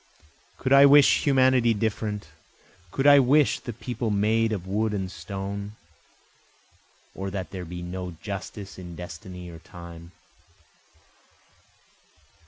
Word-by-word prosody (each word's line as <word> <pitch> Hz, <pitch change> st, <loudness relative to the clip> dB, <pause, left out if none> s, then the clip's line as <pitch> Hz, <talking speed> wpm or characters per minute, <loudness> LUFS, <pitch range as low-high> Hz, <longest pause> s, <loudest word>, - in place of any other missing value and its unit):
Could 130 Hz, +1 st, 0 dB
I 140 Hz, +1 st, +9 dB
wish 145 Hz, 0 st, +6 dB
humanity 130 Hz, -4 st, +4 dB
different? 105 Hz, -1 st, -2 dB, 0.6 s
Could 135 Hz, +9 st, -2 dB
I 145 Hz, -1 st, +8 dB
wish 140 Hz, +3 st, +3 dB
the 120 Hz, -, -6 dB
people 120 Hz, 0 st, -4 dB
made 110 Hz, +2 st, +2 dB
of 95 Hz, -4 st, -3 dB
wood 105 Hz, +2 st, -1 dB
and 95 Hz, -2 st, -3 dB
stone? 100 Hz, +1 st, -6 dB, 1.4 s
Or 95 Hz, 0 st, -5 dB
that 95 Hz, -2 st, -5 dB
there 90 Hz, -2 st, -6 dB
be 90 Hz, +1 st, -7 dB
no 90 Hz, 0 st, -6 dB
justice 100 Hz, -1 st, -7 dB
in 90 Hz, -2 st, -9 dB
destiny 90 Hz, +1 st, -9 dB
or 80 Hz, -, -11 dB
time? 85 Hz, -1 st, -12 dB
100 Hz, 120 wpm, -25 LUFS, 90-120 Hz, 1.4 s, I